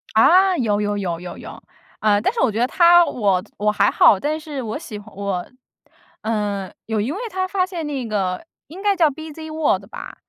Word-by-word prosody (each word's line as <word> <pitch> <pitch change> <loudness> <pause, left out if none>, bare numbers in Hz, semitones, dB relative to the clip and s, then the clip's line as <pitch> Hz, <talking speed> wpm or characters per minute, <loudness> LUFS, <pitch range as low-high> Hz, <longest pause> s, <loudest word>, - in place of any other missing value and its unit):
啊， 370 - +5
有 210 -5 +1
有 205 0 -1
有 175 -4 -3
有 180 0 -8
有。 - - -10 0.4
呃， 210 -1 +3
但 240 - +1
是 470 - -4
我 240 - +3
觉 215 - -3
得 245 - +2
他 345 +3 +6
我 195 - 0
我 210 +1 +1
还 205 -1 +3
好， 200 - +5
但 305 +5 -2
是 300 -3 -6
我 225 0 -4
喜 225 -9 -8
欢 205 +1 -15
我， 195 -3 -3 0.7
呃， 205 -3 -2
有 220 -1 -1
一 230 +7 -2
位 345 - -4
他 370 0 -1
发 370 -1 0
现 350 -4 -5
那 275 -4 -3
个， 195 - -2 0.2
应 345 +6 -10
该 405 -1 +2
叫 330 -4 +4
B‘z 315 +2 -9
World 295 -11 0
吧。 - - -9
230 Hz, 250 characters per minute, -21 LUFS, 205-320 Hz, 0.7 s, 他